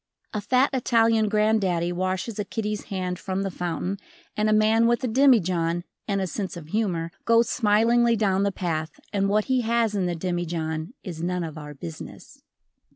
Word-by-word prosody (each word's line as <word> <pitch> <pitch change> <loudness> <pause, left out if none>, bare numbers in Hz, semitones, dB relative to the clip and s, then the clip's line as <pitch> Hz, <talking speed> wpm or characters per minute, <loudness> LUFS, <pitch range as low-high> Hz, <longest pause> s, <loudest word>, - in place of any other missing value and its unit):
A 210 - -2
fat 255 +6 +2
Italian 225 -3 +3
granddaddy 200 -5 +1
washes 185 +4 -2
a - - +1
kiddie's 210 0 -4
hand 185 -2 -3
from 190 0 -2
the 195 - -2
fountain 180 +2 -3 0.4
and 215 0 +1
a - - +3
man 220 +2 +4
with 240 +2 +1
a - - +1
demijohn 185 -10 +3 0.2
and 200 -2 0
a 190 - 0
sense 190 0 -4
of 155 -2 -10
humor 175 -5 -1
goes 230 0 +4
smilingly 230 +2 +3
down 195 -3 +1
the 200 0 +1
path 160 -4 -3
and 195 -1 +1
what 210 +1 +2
he 260 -1 +1
has 230 -1 +1
in 190 -3 0
the 175 - -1
demijohn 170 0 -3
is 170 -5 -6
none 180 +1 -1
of 160 -2 -6
our 150 -1 -8
business. 85 - -9
195 Hz, 180 wpm, -25 LUFS, 175-220 Hz, 0.4 s, man